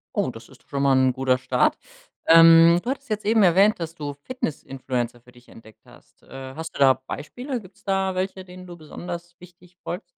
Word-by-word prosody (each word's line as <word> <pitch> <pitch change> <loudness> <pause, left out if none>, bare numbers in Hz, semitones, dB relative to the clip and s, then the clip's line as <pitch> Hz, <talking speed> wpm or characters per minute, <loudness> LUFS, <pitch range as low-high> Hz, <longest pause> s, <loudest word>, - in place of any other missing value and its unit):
Oh, - - 0
das - - -13
ist - - -20
doch - - -40
schon 140 0 -2
mal 140 -1 +4
'n 130 -1 +3
guter 130 0 +1
Start. 125 - 0 0.5
Ähm, 165 +1 +7
du 240 - -4
hattest 275 -1 -5
jetzt 215 -1 -3
eben 220 +1 +3
erwähnt, 195 +4 +4
dass 165 -1 -6
du 145 -3 -6
Fitness-Influencer 135 - -5
für 125 - -20
dich 120 0 -21
entdeckt 110 -2 -17
hast. - - -21
Äh, 130 0 -10
hast 160 0 -8
du - - -8
da 135 -1 +6
Beispiele? 245 - -7
Gibt's 190 -2 -18
da 195 -1 -1
welche, 190 0 -3
denen 185 0 -12
du 175 -1 -11
besonders 175 +2 -9
wichtig 180 0 -18
folgst? 180 +2 -5
170 Hz, 205 wpm, -23 LUFS, 135-190 Hz, 0.5 s, Ähm